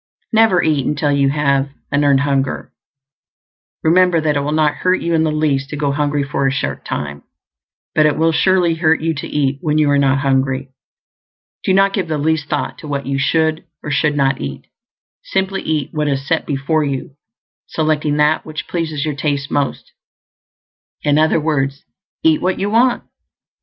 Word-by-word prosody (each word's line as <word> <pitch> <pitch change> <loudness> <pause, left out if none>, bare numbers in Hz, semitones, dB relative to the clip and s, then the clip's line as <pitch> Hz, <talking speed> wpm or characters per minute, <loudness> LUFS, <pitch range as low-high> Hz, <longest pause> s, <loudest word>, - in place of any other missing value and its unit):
NEVER 220 -5 +4
eat 150 -4 +1
until 150 0 0
you 140 -1 +2
have 140 -1 +1 0.2
an 145 0 +2
EARNED 140 -1 +4
HUNGER. 140 -1 -1 1.1
Remember 175 +1 +4
that 155 -1 0
it - - +2
will 145 +1 -2
not 150 -1 +1
hurt 185 +3 +1
you 170 - -2
in 160 - +3
the 160 -1 +1
least 145 -3 0
to - - -5
go 145 -1 0
hungry 145 0 0
for 140 -1 -1
a - - +1
short 140 - -3
time; 70 0 -5 0.7
but 155 -1 +4
it 150 - 0
will 165 +1 +3
surely 175 +1 +2
hurt 160 -1 +2
you 165 +1 0
to 145 - -6
eat 140 -2 -1
when 155 -2 0
you 150 -2 +3
are 140 - +3
not 135 -1 +3
hungry. 135 -1 0 0.9
Do 190 - +2
not 195 0 +3
give 190 -5 -1
the 155 -1 -1
least 155 0 0
thought 145 - -2
to 155 - -9
what 140 -1 -3
you 135 0 -1
should 160 +3 +1 0.2
or 150 - -4
should 150 +1 +1
not 135 -1 +1
eat; - - -6 0.6
simply 195 - -1
eat 155 -4 -2
what 150 -1 -1
is 135 -1 -2
set 165 +1 0
before 145 +3 0
you, 140 -1 -3 0.6
selecting 155 -2 0
that 150 +1 +2
which 155 -3 -7
pleases 160 -4 -2
your 155 - -1
taste 140 0 -2
most. 145 -1 -2 1.1
In 145 0 +3
other 160 +1 +3
words, 140 -3 -1 0.4
eat 160 -1 +3
what 185 0 0
you 200 +1 -2
want. 240 +3 +3
150 Hz, 185 wpm, -18 LUFS, 140-160 Hz, 1.1 s, NEVER